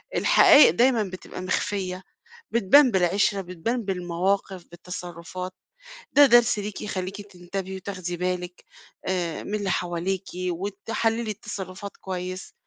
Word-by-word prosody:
الحقايق 290 - +7
دايمًا 235 +5 +3
بتبقى 185 -1 -8
مخفية 185 0 -2 0.5
بتبان 235 +5 +5
بالعِشرة، 195 +2 +2
بتبان 190 +7 -3
بالمواقف، 185 0 -1
بالتصرفات، 180 +1 -7 0.6
ده 290 0 +8
درس 240 -3 +5
ليكِ 205 0 -5
يخليكِ 195 0 -4
تنتبهي 190 0 -6
وتاخدي 185 -2 -5
بالِك 180 0 -3 0.4
آآ، 175 -3 -2
من 210 - -3
اللي 200 -2 -2
حواليكِ 175 +2 -2
وتحلّيلي 205 +5 -2
التصرفات 200 -1 -7
كويس، 185 0 -6
190 Hz, 110 wpm, -25 LUFS, 180-205 Hz, 0.6 s, ده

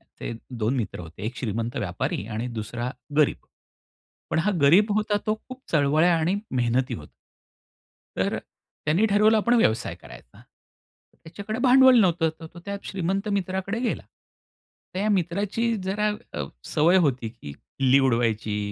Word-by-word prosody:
असे - - -8 0.3
2 115 +5 0
मित्र 115 -8 -3
होते 80 +1 -11
एक 120 +3 -5
श्रीमंत 115 0 -3
व्यापारी 95 -1 -2
आणि 115 +3 -2
दुसरा 120 +3 -4 0.3
गरीब, 150 -2 +4 0.9
पण - - +1
हा 195 +6 +2
गरीब 185 +10 +5
होता 210 -1 +1
तो 215 - +2
खूप 255 0 -9
चळवळ्या 155 +3 +4
आणि 170 +5 +1 0.2
मेहनती 125 0 0
होता. 75 -2 -10 1.1
तर - - 0
त्यांनी 170 +9 -2
ठरवलं 215 +2 +4
आपण 235 +3 +2
व्यवसाय 115 - +1
करायचा. - - -15 0.8
त्याच्याकडे 200 +7 -6
भांडवल 260 -1 +7
नव्हतं 170 -4 +2
तर 160 - -8
तो 175 - -10
त्या 200 0 -4
श्रीमंत 195 +2 -2
मित्राकडे 190 +4 -3
गेला. 245 - -1 0.9
तर 185 - -3
या 210 - +1
मित्राची 205 +7 -1
जरा 205 +3 0 0.2
अ, 75 - -3 0.3
सवय 165 +5 +5
होती, 130 -8 +1
की 110 -11 -10
खिल्ली 135 - +1
उडवायची, 110 -3 0
165 Hz, 145 wpm, -25 LUFS, -, 1.1 s, भांडवल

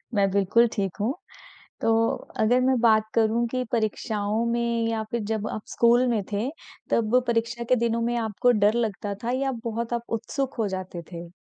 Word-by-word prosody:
मैं 195 -1 +3
बिल्कुल 200 +4 +4
ठीक 195 -5 -2
हूँ। 230 +7 0 0.7
तो 225 - +2 0.5
अगर 245 +4 +4
मैं 260 0 +2
बात 220 -2 +4
करूँ 230 +1 +2
कि 255 +1 -2
परीक्षाओं 215 -1 -1
में 235 -1 0
या 225 -1 -1
फिर 235 - -1
जब 215 -1 -1
आप 215 - -5
स्कूल 240 +2 +4
में 225 -4 +1
थे, 205 +5 0 0.4
तब 230 +2 +3
परीक्षा 235 +1 -1
के 250 +2 +3
दिनों 235 0 0
में 240 +1 0
आपको 225 +1 +1
डर 210 -2 +3
लगता 215 -3 -2
था 235 - 0
या 270 -1 0
बहुत 230 +1 -3
आप 235 - -2 0.2
उत्सुक 270 +4 -3
हो 215 -3 +1
जाते 185 -2 -5
थे? 170 0 -7
230 Hz, 185 wpm, -25 LUFS, 210-235 Hz, 0.7 s, बिल्कुल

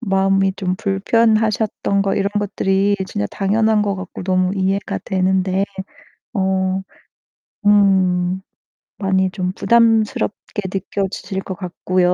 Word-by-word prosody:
마음이 195 -2 +2
좀 185 -2 -1
불편하셨던 215 0 +1
거 195 -1 0
이런 200 0 +1
것들이 200 0 +1
진짜 100 - -2
당연한 215 +2 +2
것 200 -1 0
같고 185 0 -7
너무 185 0 +1
이해가 195 +1 -1
되는데 190 0 +1 0.7
어 190 -1 0 0.8
음 190 -3 +3 0.6
많이 190 -1 +1
좀 185 -2 -2
부담스럽게 225 -2 +1
느껴지실 195 0 -3
것 190 - -5
같고요, 180 0 0
195 Hz, 240 characters per minute, -19 LUFS, 190-205 Hz, 0.8 s, 음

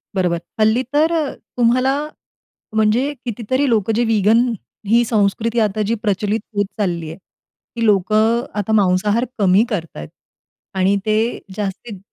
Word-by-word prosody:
बरोबर. 180 -3 +1 0.2
हल्ली 220 +4 +3
तर 315 +3 +3
अ, 310 -4 -1 0.2
तुम्हाला 255 +3 +3 0.8
म्हणजे 220 +7 +2
कितीतरी 245 +4 -1
लोकं 220 -1 +1
जे 240 - +2
व्हेगन 225 +2 +3 0.5
ही 235 +2 +5
संस्कृती 220 +2 0
आता 215 -1 0
जी 230 - +2
प्रचलित 205 +2 0 0.2
होत 205 - +1
चालली 170 -5 -1
आहे, 160 - -8
ती 230 +4 -9
लोकं 215 +3 +3
अ, - - -10
आता 205 +1 -2
मांसाहार 205 +5 +2
कमी 195 +1 +4
करतायत 165 - -5 0.7
आणि 190 +2 +3
ते 215 0 +2 0.4
जास्तीत 205 0 -5
215 Hz, 140 wpm, -19 LUFS, 195-235 Hz, 0.8 s, ही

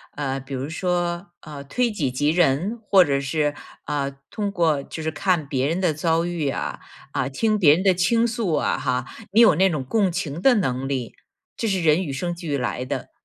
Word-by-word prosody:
呃， 135 -2 -2
比 135 +1 -9
如 135 +2 -3
说， 175 +1 -2
呃， 150 -2 -9
推 245 - 0
己 160 -11 -1
及 145 +4 0
人， 175 - +1
或 190 -3 +7
者 140 -4 0
是， 145 +2 0 0.3
啊， 140 -1 -2 0.2
通 205 -2 -2
过 160 -7 +1
就 160 - -7
是 160 - -1
看 170 -2 0
别 135 0 0
人 170 +4 -1
的 170 -4 +2
遭 165 +2 +1
遇 175 -4 -2
呀， 135 - -3 0.3
啊， - - -1
听 215 +10 0
别 150 -5 +7
人 180 - 0
的 190 -2 +5
倾 210 +7 +2
诉 230 -7 -1
啊 150 - +1
哈， 125 0 -1 0.3
你 225 - +6
有 225 -8 +7
那 190 +4 +4
种 150 -6 -2
共 195 - +1
情 170 -3 -4
的 265 +2 +5
能 135 - -1
力， 130 -4 -3 0.4
这 225 - -1
是 190 -4 0
人 160 +3 +4
与 140 - -4
生 175 +6 -2
俱 165 -5 -3
来 125 0 -2
的。 - - -5
160 Hz, 225 characters per minute, -23 LUFS, 140-185 Hz, 0.4 s, 或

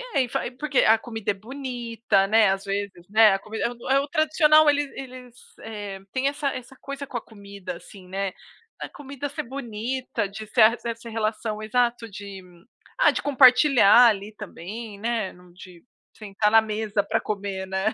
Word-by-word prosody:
bem 265 - +3
e - - -10
fa - - -1 0.2
porque 300 -2 0
a 220 +1 +5
comida 225 -2 -3
é - - -2
bonita, 235 -2 -2
né, 215 0 +5
às 195 0 -1
vezes, 200 -3 -4
né, 215 -1 +6
a 195 - 0
comida 220 +2 -4
é - - +1
o 240 +1 -9
é 270 - +5
o 280 - -3
tradicional, 310 0 +4
eles 290 -1 +1
eles, 255 -2 -10 0.2
eh, 205 -3 -7
tem 260 +1 0
essa 285 0 -1
essa 255 +1 -9
coisa 275 0 -6
com 260 -3 -5
a - - -4
comida, 200 -4 -9
assim, 185 +1 -15
né. 195 0 -3 0.5
Da - - -5
comida 280 0 -7
ser 285 - -5
bonita, 240 -2 -4
de 210 +2 -8
ser 215 - +2
a 225 +2 +6
essa 230 0 -5
relação 215 -1 -3
exato 235 +1 0
de 200 -1 -9 0.6
ah, - - +6
de - - -3
compartilhar 250 -4 +6
ali 210 -1 -1
também, 210 +2 -8
né, 225 -3 -2
não 180 0 -18
de 180 -1 -14 0.3
sentar 210 0 0
na 225 +1 +6
mesa 215 -1 -2
pra 225 +2 0
comer, 195 -2 -4
né. 190 +3 -1
220 Hz, 185 wpm, -24 LUFS, 200-255 Hz, 0.6 s, né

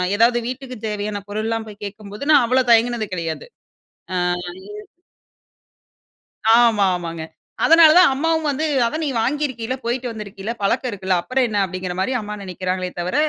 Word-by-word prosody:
ஏதாவது 235 +3 +4
வீட்டுக்கு 255 0 -6
தேவையான 210 0 -3
பொருள் 215 +2 -3
எல்லாம் 225 -1 -2
போய் 210 0 -12
கேட்கும்போது, 205 +3 -8
நான் 290 - +6
அவ்வள 255 +2 +2
தயங்கினது 230 -1 +3
கிடையாது, 165 -3 -4 0.7
ஆ 185 - 0 0.5
இது 210 0 -9 1.7
ஆமா, 220 -4 +4
ஆமாங்க. 165 -2 -5 0.4
அதனால 330 -1 +7
தான் 360 -6 +7
அம்மாவும் 320 +3 0
வந்து, 285 +3 -1 0.2
அதான் 310 +8 -2
நீ - - -1
வாங்கியிருக்கீல, 260 -2 -2
போயிட்டு 245 +2 -2
வந்திருக்கீல, 210 -1 -6
பழக்கம் 245 +6 0
இருக்குல்ல, 190 -2 -1
அப்புறம் 255 +6 0
என்ன? 210 -2 -1
அப்பிடிங்கிறமாரி 185 +4 -3
அம்மா 210 0 -6
நினைக்கிறாங்களே 185 0 -3
தவர 180 +5 -2
220 Hz, 145 wpm, -20 LUFS, 195-255 Hz, 1.7 s, அதனால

